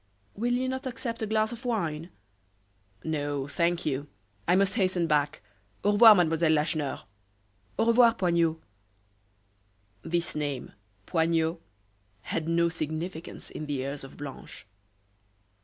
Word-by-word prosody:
"Will 240 +4 -1
you 255 +1 0
not 260 0 -3
accept 235 -2 -5
a 220 - -1
glass 215 0 +1
of 240 +1 -8
wine?" 170 -9 -2 0.9
"No, 145 -3 -2
thank 170 +3 0
you. 145 0 -1 0.4
I 180 - +5
must 195 0 +3
hasten 185 -5 +1
back. 150 -1 +1 0.4
Au 205 - +4
revoir, 215 +1 +9
Mademoiselle 165 -2 +3
Lacheneur." 150 -2 -1 0.7
"Au - - +2
revoir, 235 0 +6
Poignot." 170 -4 +1 1.4
This 170 +3 -2
name 145 -4 -3 0.3
Poignot 165 0 +1 0.6
had 165 +6 -3
no 170 0 +3
significance 160 +1 -5
in 155 - -6
the 145 -1 -2
ears 135 +2 -4
of 135 - -11
Blanche. 145 -7 -9
165 Hz, 125 wpm, -28 LUFS, 150-205 Hz, 1.4 s, revoir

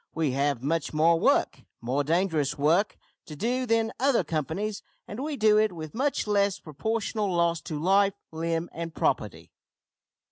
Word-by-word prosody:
We 155 -4 +1
have 140 -1 0
much 160 +1 -1
more 165 +2 +4
work - - +2 0.2
more 130 +5 -1
dangerous 155 -3 0
work 160 +8 +2 0.3
to 155 - -8
do 250 - -1
than 225 -1 +2
other 270 -1 +3
companies, 165 +7 -3 0.3
and 205 - -7
we 300 -1 -3
do 215 -2 +5
it 215 0 +2
with 155 -3 -8
much 275 +4 0
less 200 -2 +1
proportional 210 +5 -2
loss 170 -1 +1
to 155 -4 -5
life, 195 +4 +3 0.2
limb, 165 +1 -2
and 165 0 -6
property." - - -1
170 Hz, 155 wpm, -27 LUFS, 155-215 Hz, 0.3 s, do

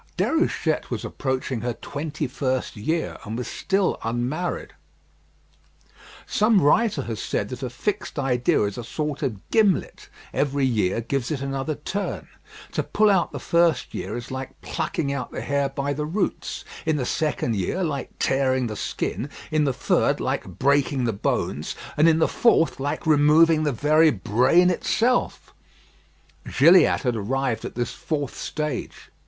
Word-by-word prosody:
Déruchette - - 0
was - - -3
approaching 130 -3 -2
her 120 0 -2
twenty 150 +3 -4
first 130 -1 -2
year, 160 +10 -2
and 110 +2 -5
was 125 - -4
still 195 0 0
unmarried. 125 +10 -2 1.5
Some 215 0 +3
writer 210 +9 +3
has 115 -2 -4
said 100 - -2
that 125 -1 -7
a 130 - -3
fixed 190 - -3
idea 125 -5 +2
is 100 +3 -2
a - - -5
sort 150 +4 -3
of 115 -9 -3
gimlet; 210 -5 +1 0.2
every 140 -1 +1
year 110 -4 +1
gives 125 +1 -2
it 150 - -2
another 135 +2 -2
turn. 195 +8 -4 0.4
To - - 0
pull 215 -1 +3
out 190 -3 +2
the - - -5
first 170 -5 +2
year - - -4
is 120 - -8
like 130 0 -6
plucking 155 -3 -2
out 140 -3 -4
the - - -5
hair 140 -1 0
by 140 +1 -2
the 150 +1 -3
roots; 185 +6 -2 0.2
in 160 -1 +1
the 135 -4 -1
second 135 -5 -1
year, 105 - -1
like 145 -5 -2
tearing 130 -1 +1
the 110 -2 -4
skin; 130 +5 -3 0.2
in 155 -1 +2
the 135 - +2
third, - - +1
like - - -3
breaking 140 -1 +2
the 115 -2 0
bones; 100 - -2 0.2
and 155 +2 +5
in 160 - +3
the 160 - +3
fourth, 200 - +3
like 140 +2 -3
removing 155 +1 +5
the 145 - +2
very 155 +5 +4
brain 130 - +3
itself. 240 +7 0 1.0
Gilliatt 170 +7 +6
had 125 -3 +1
arrived 120 +2 -1
at - - -7
this 120 -1 -2
fourth 155 -5 -3
stage. 150 -5 -4
140 Hz, 160 wpm, -24 LUFS, 125-160 Hz, 1.5 s, Gilliatt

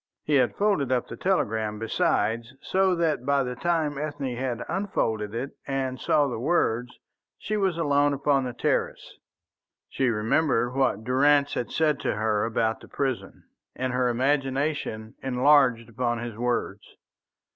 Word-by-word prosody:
He 150 - -1
had 125 -2 +2
folded 200 -11 +1
up 125 -2 +1
the - - -7
telegram, 110 - 0
besides, 115 -1 0
so 190 -1 +1
that 165 -7 0
by 140 0 +2
the 125 -1 -4
time 155 -1 0
Ethne 145 -4 -3
had 125 -1 -3
unfolded 115 - -2
it 130 +4 -3 0.2
and 135 -2 -2
saw 145 -1 +3
the 120 -4 -4
words, 125 -4 0 0.4
she 215 - -3
was 190 -5 0
alone 145 -3 +2
upon 140 -1 +1
the 125 - -4
terrace. - - -2 0.7
She 130 -2 0
remembered 120 +3 +1
what 130 -6 +1
Durrance 140 +3 +3
had 120 - -2
said 155 -2 +1
to - - -1
her 105 -1 0
about 115 -1 0
the - - -14
prison, 135 -3 -3 0.3
and 130 0 -2
her 125 0 +2
imagination 135 -3 -1
enlarged 130 -3 +3
upon 120 +1 -1
his 120 -1 -5
words. 120 -4 -2
130 Hz, 150 wpm, -26 LUFS, 115-145 Hz, 0.7 s, saw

